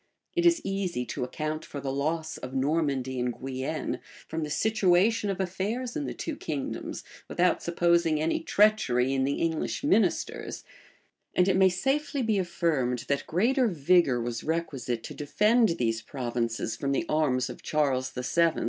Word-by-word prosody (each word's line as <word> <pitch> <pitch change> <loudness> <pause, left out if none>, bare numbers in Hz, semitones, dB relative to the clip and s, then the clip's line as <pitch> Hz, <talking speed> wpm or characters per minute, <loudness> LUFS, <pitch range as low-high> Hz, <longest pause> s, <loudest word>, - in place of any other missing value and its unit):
It 345 0 +4
is 340 -1 +4
easy 185 -10 -2
to - - -4
account 155 +4 -3
for 145 - -7
the 135 -1 -3
loss 160 +3 -2
of 130 +1 -7
Normandy 135 -2 0
and 125 -1 -1
Guienne, 135 +4 -3 0.3
from 160 +1 -3
the 150 - -4
situation 205 +4 +2
of 195 -2 -2
affairs 205 +7 -2
in 295 -2 -2
the - - -4
two 320 - -4
kingdoms, 150 - -4 0.2
without 180 +1 +2
supposing 170 -2 +2
any 160 +2 +1
treachery 150 - +3
in 135 -1 +1
the 140 - 0
English 165 - -1
ministers; 215 - +1 0.7
and 180 - +4
it 190 - +3
may 190 0 +6
safely 270 +8 0
be 220 -3 +2
affirmed, 155 -9 0
that 140 0 0
greater 240 - +2
vigor 165 - +3
was 120 0 -3
requisite 135 -8 -2
to - - -7
defend 215 +9 +3
these 115 -2 0
provinces 120 -3 -2
from 140 -1 -1
the 140 - 0
arms 145 -5 +1
of - - -8
Charles 135 -4 0
VII. 165 +6 +1
160 Hz, 160 wpm, -28 LUFS, 130-190 Hz, 0.7 s, may